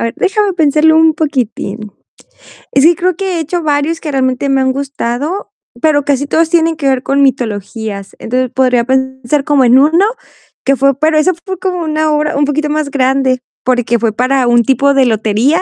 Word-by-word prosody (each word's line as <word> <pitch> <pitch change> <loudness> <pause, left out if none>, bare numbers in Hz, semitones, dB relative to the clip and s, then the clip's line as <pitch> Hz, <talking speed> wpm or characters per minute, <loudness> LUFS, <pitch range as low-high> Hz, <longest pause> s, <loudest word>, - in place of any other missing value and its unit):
a - - -2
ver, 230 - -3
déjame 415 0 0
pensarlo 315 -1 +3
un 320 -1 +4
poquitín. 235 -8 -3 0.8
Y 275 - +3
sí, 325 - +6
que 345 - +2
creo 365 +1 -1
que 380 -3 -2
he - - -2
hecho 330 +2 -3
varios 300 +2 0
que 305 -3 -5
realmente 260 0 -1
me 270 -1 +2
han 260 0 +1
gustado, 280 +6 -4 0.3
pero 290 -3 +2
casi 285 0 0
todos 320 +3 +1
tienen 330 -1 +1
que 280 -3 -2
ver 260 -1 +1
con 275 +1 0
mitologías. 220 -5 -2
Entonces, 255 +1 -2
podría 250 -2 +2
pensar 265 +1 -1
como 280 -3 +2
en 245 +2 +5
uno 325 +7 +3 0.6
que 275 - +2
fue 275 0 +1
pero 310 +1 +1
eso 365 +4 +2
fue 380 -2 -5
como 360 -2 -2
una 310 0 0
obra 300 0 0
un 290 - +2
poquito 295 +1 -1
más 305 -1 -1
grande, 265 -1 +1 0.2
porque 245 -2 0
fue 225 -1 0
para 255 +2 +1
un 240 0 +4
tipo 275 +2 +2
de 270 -1 +3
lotería, 225 - +1
275 Hz, 200 wpm, -13 LUFS, 255-315 Hz, 0.8 s, sí